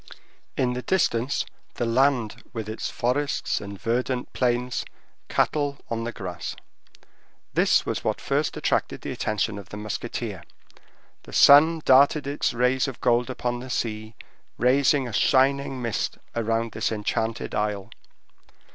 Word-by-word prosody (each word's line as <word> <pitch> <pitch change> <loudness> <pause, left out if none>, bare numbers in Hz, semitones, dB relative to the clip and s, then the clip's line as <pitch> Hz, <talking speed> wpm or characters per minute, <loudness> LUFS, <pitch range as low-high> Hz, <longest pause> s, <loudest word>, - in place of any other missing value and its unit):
In 125 -1 +1
the 125 - -3
distance, 130 -4 +1 0.3
the 120 - -1
land 120 -2 +1
with 110 -3 -4
its 110 +1 -4
forests 140 +4 -1
and 100 -1 -8
verdant 125 +2 -1
plains; 125 0 0 0.5
cattle 145 -2 +1
on 115 0 -2
the 120 - -3
grass. 90 -6 -6 1.0
This - - +3
was - - -3
what - - -1
first - - -1
attracted - - 0
the - - -5
attention 105 -1 -1
of 100 -1 -12
the 105 - -7
musketeer. 105 -1 -4 0.8
The - - -14
sun 155 +3 +7
darted 140 +3 +5
its 140 +1 0
rays 125 +3 +1
of 130 - -6
gold 120 0 +2
upon 120 -1 -2
the 130 +1 -8
sea, 110 -2 -3 0.4
raising 135 +2 +3
a 120 - -7
shining 135 +2 +2
mist 115 -2 -2 0.2
round 115 0 0
this - - -1
enchanted 110 +1 -2
isle. 105 -1 -2
120 Hz, 140 wpm, -25 LUFS, 110-130 Hz, 1.0 s, sun